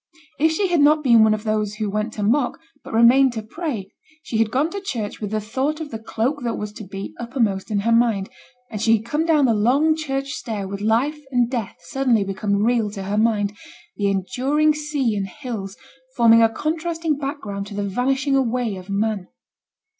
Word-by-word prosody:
If 320 +2 +4
she 380 +3 0
had 345 -2 +2
not 300 +1 +4
been 235 -4 +6
one 215 -1 +4
of 215 - -8
those 215 -1 -1
who 215 0 -2
went 210 +2 -2
to 210 - -4
mock, 245 +8 +1 0.2
but - - -10
remained 240 +3 +5
to 220 -2 -4
pray, 235 - -5 0.3
she 225 - -3
had 225 -1 +3
gone 285 +8 0
to 400 - -5
church 225 - -4
with 210 - -3
the 215 +1 -1
thought 265 +8 -2
of 315 -2 -6
the 225 - -5
cloak 235 +6 -2
that 235 -1 -2
was 210 0 -5
to 215 - -9
be 195 0 -7
uppermost 235 -5 -1
in 205 -2 0
her 230 +3 +1
mind, 230 -4 +3 0.4
and 210 -2 -4
she 225 0 +4
had 220 - -10
come 310 +6 -1
down 305 -4 +4
the 235 - +3
long 270 +9 +3
church 275 -3 -3
stair 215 -8 -4
with 200 +1 -6
life 240 +8 +1
and 245 -2 +1
death 235 -6 -3
suddenly 255 -6 +1
become 200 +1 -1
real 230 -2 +2
to 200 -1 -6
her 200 +2 -2
mind, 210 -2 +1 0.4
the 205 - 0
enduring 265 +11 +1
sea 295 -6 -1
and 195 -1 -2
hills 210 -3 -6 0.4
forming 230 -1 +6
a 225 - +5
contrasting 325 +3 -2
background 220 -9 -4
to 200 - -8
the 205 - -2
vanishing 265 +6 0
away 245 -5 0
of 185 +1 -11
man. 200 -1 -1
230 Hz, 205 wpm, -22 LUFS, 210-275 Hz, 0.4 s, been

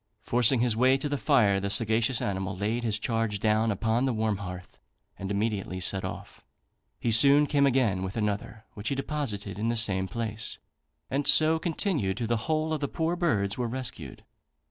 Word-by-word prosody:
Forcing 120 +1 +2
his 120 -3 +1
way 130 +3 +4
to 135 - -4
the 145 - -1
fire, 105 -9 +3
the 100 +1 -3
sagacious 110 +3 +2
animal 95 -1 -3
laid 110 +5 -2
his 110 -2 0
charge 115 -2 -1
down 110 +1 +2
upon 110 +4 0
the 130 - 0
warm 110 -2 0
hearth, 90 -2 -9 0.4
and 95 - -5
immediately 100 -2 -2
set 95 +1 -2
off. 95 - -8 0.6
He 120 - 0
soon 140 +6 +6
came 140 -1 +2
again 120 -8 +1
with 95 +3 -5
another, 105 +1 -3
which 105 +1 -4
he 140 - -1
deposited 110 - -4
in 115 +2 0
the 120 - 0
same 95 -4 +1
place, 115 0 -4 0.5
and 140 +2 -1
so 160 +1 +5
continued 160 - -1
till 120 - -2
the 115 +1 0
whole 155 0 0
of 155 - -1
the 140 - -2
poor 165 +4 -1
birds 110 - 0
were 120 - 0
rescued. 115 - -6
115 Hz, 190 wpm, -27 LUFS, 100-135 Hz, 0.6 s, soon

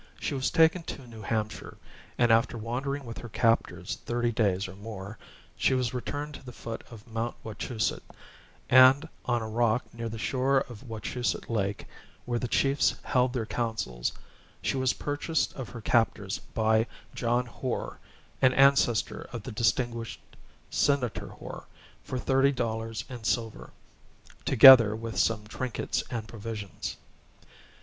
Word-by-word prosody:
She - - -2
was 130 -1 0
taken 165 +2 +4
to 135 -5 -7
New 115 -2 -11
Hampshire, 110 0 -3 0.4
and 120 -1 +4
after 115 +1 +3
wandering 135 +5 -3
with 115 -1 -7
her 120 - -8
captors 115 +1 +1
thirty 120 0 0
days 100 -4 +1
or 95 - -10
more, 100 0 -8 0.4
she 130 - +2
was 125 -2 0
returned 145 +4 -4
to - - -10
the 125 - -9
foot 115 -1 -7
of 110 -3 -12
Mount 115 +1 -3
Wachusett; 110 +1 -2 0.7
and 130 +4 +7 0.2
on 120 -2 0
a - - -4
rock 115 +2 +1
near 115 0 -4
the 115 - -6
shore 130 +4 +1
of 120 -6 -8
Wachusett 120 0 -3
Lake, 100 -2 -1 0.4
where 120 -1 -1
the 125 - -2
chiefs 135 +4 +2
held 125 0 +2
their 120 -4 -1
councils, 110 - -2 0.5
she - - 0
was 130 -1 +2
purchased 145 +2 -1
of 130 -3 -7
her 120 - -8
captors 110 -4 +1 0.2
by 110 +1 +3 0.3
John 120 +1 0
Hoar, 125 +1 -4 0.4
an 130 -1 +5
ancestor 135 -4 +3
of 120 -4 -6
the 130 - -6
distinguished 115 +1 0 0.5
Senator 140 -5 +1
Hoar, - - -9 0.4
for 130 - -4
thirty 135 +2 +3
dollars 115 -3 -3
in 120 -3 -8
silver, 115 -1 -2 0.8
together 125 -4 +9
with 115 0 -4
some 110 -2 +1
trinkets 120 +3 -2
and 115 -3 -4
provisions. 105 -4 -6
120 Hz, 145 wpm, -28 LUFS, 110-130 Hz, 0.8 s, together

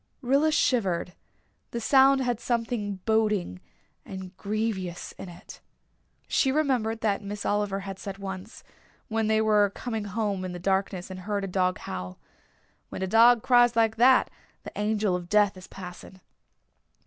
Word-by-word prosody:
Rilla 280 +5 +3
shivered; 190 - +1 0.6
the 235 - -4
sound 270 +2 +5
had 245 -3 -1
something 230 -4 -2
boding 210 - 0 0.4
and 190 -1 -9
grievous 200 -4 -3
in 190 - -10
it. 170 - -13 0.7
She 265 - +2
remembered 250 -7 0
that 210 -3 0
Miss 205 0 -6
Oliver 205 -1 -1
said 195 0 -7
once, 195 +2 -8 0.5
when 220 -1 0
they 220 0 +3
were 210 -2 +4
coming 225 -4 -4
home 205 -2 -2
in 185 -1 -5
the - - -5
darkness 190 0 -1
and 185 - -7
heard 200 +1 -3
a - - -2
dog 185 0 0
howl, 90 0 -7 0.7
"When - - -5
a - - -1
dog 230 +3 +5
cries 245 -1 +5
like 225 -1 +2
that 255 +2 +5 0.3
the - - -8
Angel 210 -2 0
of 175 -1 -6
Death 210 -1 +3
is 185 0 -12
passing." 185 0 -10
210 Hz, 150 wpm, -27 LUFS, 190-230 Hz, 0.7 s, sound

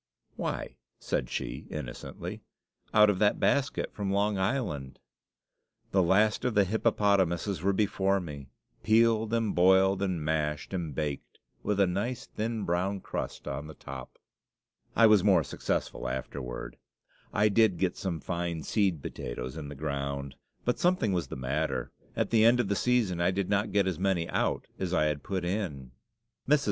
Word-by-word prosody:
"Why," - - -4 0.2
said 60 - -2
she, - - -4
innocently, - - -6 0.5
"out 105 0 +6
of 95 - -3
that 105 -1 +3
basket 140 -1 +1
from 100 -2 -3
Long 100 +1 +2
Island!" 95 - -2 0.9
The 95 - +4
last 105 +5 +3
of 125 -3 0
the 100 - +6
hippopotamuses 100 -4 +1
were 100 +2 +2
before 100 -1 +1
me, 70 -6 -8 0.3
peeled, 110 0 +3
and 115 -3 +1
boiled, 95 +2 +4
and 90 -6 -1
mashed, 75 +1 -1
and 85 -7 -3
baked, 75 -2 -4 0.2
with 105 -1 -1
a 100 - +6
nice 115 +8 -2
thin 110 0 -3
brown 95 +3 0
crust - - -5
on 75 - -4
the 80 - -10
top. 65 -1 -9 0.8
I 115 - +7
was 105 -4 +6
more 95 -6 +5
successful - - -3
afterward. 60 -2 -5 0.5
I 105 +1 +3
did 105 -3 +4
get 90 +1 0
some 95 -6 -3
fine 85 -3 -3
seed 95 -9 +1
potatoes - - -5
in 75 -3 -6
the 75 - -7
ground. 70 -1 -3 0.3
But 125 - +1
something 175 - +2
was 90 -2 -1
the - - -6
matter; 70 +5 -2 0.2
at - - -1
the 110 -2 +5
end 120 +2 +6
of 115 -5 +1
the 100 - +1
season 110 -7 +1
I 85 - +3
did 95 +1 -1
not 100 +1 +1
get 100 0 +3
as 95 -4 -2
many 95 -3 +1
out - - 0
as 90 -1 -1
I - - +3
had 75 -1 -1
put 95 +1 -3
in. 85 -10 -3 0.6
Mrs. 150 0 +6
95 Hz, 165 wpm, -29 LUFS, 80-105 Hz, 0.9 s, I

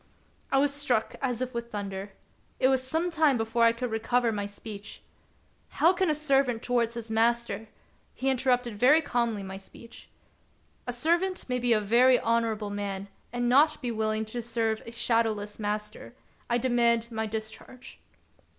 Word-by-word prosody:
I 270 - +3
was 280 +1 +3
struck 255 -6 0
as 255 -2 -1
with 235 0 -4
thunder. 200 -1 -5 0.5
It 260 - +4
was 265 -1 +2
some 320 +7 -1
time 310 -5 +3
before 225 +1 +1
I 230 - +6
could 235 +1 -4
recover 230 +2 +1
my 205 -2 -3
speech. 205 0 -9 0.3
" - - -38
How 340 +4 +6
can 370 -1 +1
a 305 - +2
servant 275 -6 +1
towards 235 -2 0
his 230 -1 -6
master" 225 -1 +1 0.2
— - - -38
He 265 - -3
inter 265 0 +1
rupted 245 -2 +1
very 255 +9 +5
calmly 235 -6 -1
my 190 0 -7
speech: 230 +4 -14 0.2
— - - -38
" - - -35
A - - -1
servant 345 +8 0
may 250 -1 -1
be 245 0 +1
a 220 - +5
very 240 +5 +5
honorable 225 -2 0
man, 200 -1 -4 0.2
and 245 0 -1
not 290 +5 +4
be 245 -4 -3
willing 220 0 -1
to 235 +3 -5
serve 225 -1 -1
a - - -6
shadowless 225 -3 0
master. 210 +2 -4 0.3
I 240 - +3
demand 235 -1 +2
my 220 -1 -2
discharge." 220 +4 -8
235 Hz, 180 wpm, -28 LUFS, 220-255 Hz, 0.5 s, I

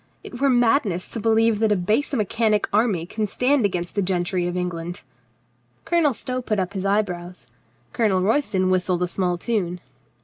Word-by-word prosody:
It 245 - -9
were 280 - +4
madness 230 - +2
to 230 - -3
believe 225 0 +2
that 220 -1 +2
a - - +4
base 210 +11 0
mechanic 220 -3 +1
army 205 -6 +2
can 215 +4 -3
stand 250 +4 +1
against 175 -2 -4
the 200 - 0
gentry 180 -1 -1
of 175 0 -3
England." 175 -1 -4 0.8
Colonel 325 -7 +2
Stow 255 +2 -4
put 220 -3 -2
up 190 0 -2
his 195 0 -2
eyebrows. 180 -3 -2 0.5
Colonel 205 -5 +2
Roys 225 +8 +1
ton 185 -2 +1
whistled 180 -1 +1
a - - 0
small 180 -1 -1
tune. 180 -3 -2
200 Hz, 175 wpm, -23 LUFS, 180-230 Hz, 0.8 s, were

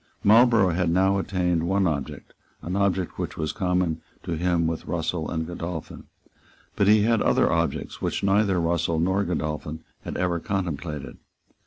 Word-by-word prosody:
Marlborough 110 -2 +5
had 85 +1 0
now 95 +3 +3
attained 90 -3 0
one 95 +3 +1
object, 75 -6 -3 0.3
an 90 +4 -3
object 95 -2 0
which - - -4
was 80 -1 -1
common 90 -4 0 0.2
to - - -5
him 85 0 +1
with 80 0 -3
Russell 80 -1 -2
and 80 -1 -2
Godolphin. 85 -1 -6 0.7
But 100 -2 +2
he 105 0 +6
had 115 0 +2
other - - +3
objects - - -2
which - - -2
neither 100 -1 +3
Russell 85 -1 0
nor 95 +4 +1
Godolphin 75 -2 -3 0.2
had - - -5
ever 90 -2 0
contemplated. 75 -8 -4
90 Hz, 155 wpm, -25 LUFS, 80-95 Hz, 0.7 s, he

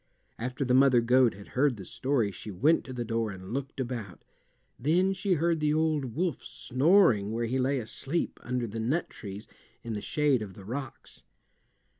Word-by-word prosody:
After 125 +4 -2
the 125 - +2
mother 130 -1 +6
goat 125 -1 +4
had 100 0 -12
heard 130 -2 +2
the 95 - -8
story 130 -4 0
she 95 +3 -8
went 140 - +3
to 130 - -8
the 120 -2 -4
door 115 -1 -1
and 95 +1 -8
looked 135 +1 -4
about. 120 -7 -5 0.6
Then 175 +9 +2
she 195 0 0
heard 165 +1 +1
the 150 0 +2
old 155 -7 0
wolf 175 -5 -1
snoring 130 - +3
where 115 +1 -1
he 130 +3 -1
lay 135 +2 +1
asleep 135 +7 -3
under 125 0 -2
the 115 0 -5
nut 135 +10 -1
trees 100 +1 -8 0.4
in 115 - -4
the 105 - -3
shade 145 0 +1
of 100 -4 -7
the 95 - -12
rocks. 130 +4 -6
125 Hz, 185 wpm, -29 LUFS, 110-145 Hz, 0.6 s, mother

